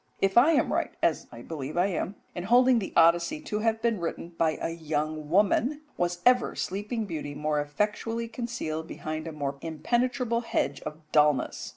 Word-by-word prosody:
If 195 0 +1
I 270 +8 +7
am 290 - +2
right, - - 0
as - - +1
I - - -10
believe 150 -1 -6
I 175 - +4
am, 195 +1 -2 0.2
in 175 - -5
holding 245 +2 +5
the 195 - -5
Odyssey 170 - +4
to 215 -9 -3
have 225 0 0
been 230 -4 +1
written 170 0 -4
by 165 -2 0
a - - -2
young 155 -2 -3
woman, 210 - +2
was 175 0 -1
ever 250 -1 +4
sleeping 210 +4 -3
beauty 150 -6 -5
more 150 0 0
effectually 210 +9 -2
concealed 225 -10 -4
behind 155 -1 -5
a - - -4
more 140 -2 -3
impenetrable 235 - 0
hedge 230 - -1
of 150 - -6
dulness? 150 -3 +2
175 Hz, 180 wpm, -28 LUFS, 155-230 Hz, 0.2 s, I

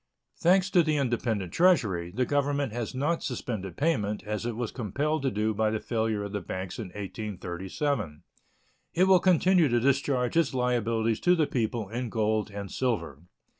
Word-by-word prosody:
Thanks 185 +3 +3
to 180 - +6
the 155 -2 +1
independent 115 -8 -1
treasury, 110 - +3
the 125 +7 0
Government 140 -3 0
has 120 +1 -4
not 150 +6 0
suspended 110 - -4
payment, 105 -10 0
as 105 +2 -3
it 120 - -3
was 120 -1 -3
compelled 140 +7 -1
to 135 - +1
do 110 -1 0
by 110 +1 +1
the 110 0 -1
failure 110 -3 -1
of 100 - -5
the 100 -1 -3
banks 95 +3 -5
in 110 - -4
1837. 95 - -4 0.7
It 180 - +4
will 190 -1 +6
continue 180 -1 +4
to 120 -2 +2
discharge 135 0 +1
its 165 -5 +2
liabilities 115 -3 +1
to 180 0 +4
the 160 -3 +2
people 115 -4 -2
in 120 +2 -3
gold 110 -1 0
and 100 -1 -7
silver. 115 - -2
120 Hz, 170 wpm, -28 LUFS, 105-145 Hz, 0.7 s, to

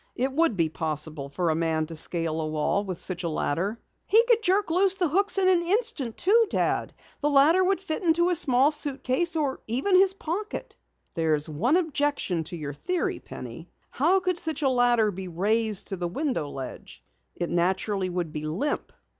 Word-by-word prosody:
It 260 +2 -1
would 310 -4 +1
be 165 -3 +1
possible 155 -2 -4
for 170 +3 -1
a - - 0
man 160 -1 0
to 165 +1 -8
scale 165 0 +1
a 155 - -2
wall 155 +6 0
with 185 -3 -5
such 180 0 -4
a 170 - -1
ladder." 180 +8 -2 0.3
"He 445 +3 +5
could 470 -2 +3
jerk 390 -2 +1
loose 380 +2 +3
the 365 -3 +1
hooks 395 +6 +2
in 380 -1 +3
an 365 -2 +4
instant, 360 - 0
too, 450 +4 +4
Dad. - - 0 0.3
The 295 - 0
ladder 300 +6 +5
would 385 0 +1
fit 320 -5 -4
into 345 0 +2
a - - +2
small 275 -4 +4
suitcase, 295 +2 -1
or 290 -4 -1
even 265 - +1
his 385 +1 +5
pocket!" 425 +6 -5 0.4
"There's 155 -3 0
one 210 - +1
objection 290 - -1
to 175 - -7
your 145 -2 -5
theory, 360 - -2
Penny. - - -10 0.2
How 385 +1 +2
could 365 -1 -1
such 320 -1 -3
a 270 - +3
ladder 240 -4 +3
be 190 0 -7
raised 210 +4 0
to 195 - -3
the 175 0 -2
window 250 - -2
ledge? 135 -2 -9 0.3
It 175 - -3
naturally 185 +2 0
would 175 -3 -3
be 150 - -4
limp." 195 - -3
250 Hz, 190 wpm, -26 LUFS, -, 0.4 s, He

